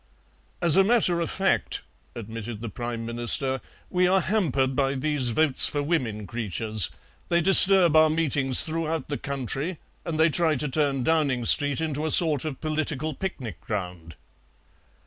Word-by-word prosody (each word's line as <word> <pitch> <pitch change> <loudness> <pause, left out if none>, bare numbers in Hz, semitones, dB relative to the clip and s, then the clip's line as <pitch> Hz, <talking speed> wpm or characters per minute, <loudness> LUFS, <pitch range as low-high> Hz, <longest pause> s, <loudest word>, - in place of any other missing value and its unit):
"As 170 0 +7
a 195 - +5
matter 200 -5 +1
of 170 - -3
fact," 195 0 -2 0.3
admitted 115 0 -8
the 115 +1 -7
Prime 120 +1 -7
Minister, 120 +3 -2 0.3
"we 180 0 +1
are 190 +1 +2
hampered 145 - -2
by 135 0 -1
these 140 -2 -2
votes 140 +3 +3
for 145 -1 -4
women 125 -10 -3
creatures; 110 -4 -3 0.4
they 170 - +1
disturb 185 -2 +8
our 155 0 +4
meetings 145 -5 +1
throughout 160 -2 -4
the 145 - -5
country, 140 - -5 0.3
and 160 -2 -6
they 160 0 +2
try 160 -1 +1
to 150 +2 -3
turn 140 -2 -2
Downing 140 -6 -1
Street 145 +4 +4
into 155 -2 -4
a 160 - -2
sort 155 -4 +4
of 145 -4 -6
political 155 -1 -4
picnic 125 - -8
ground." 90 -4 -7
145 Hz, 155 wpm, -23 LUFS, 120-165 Hz, 0.4 s, disturb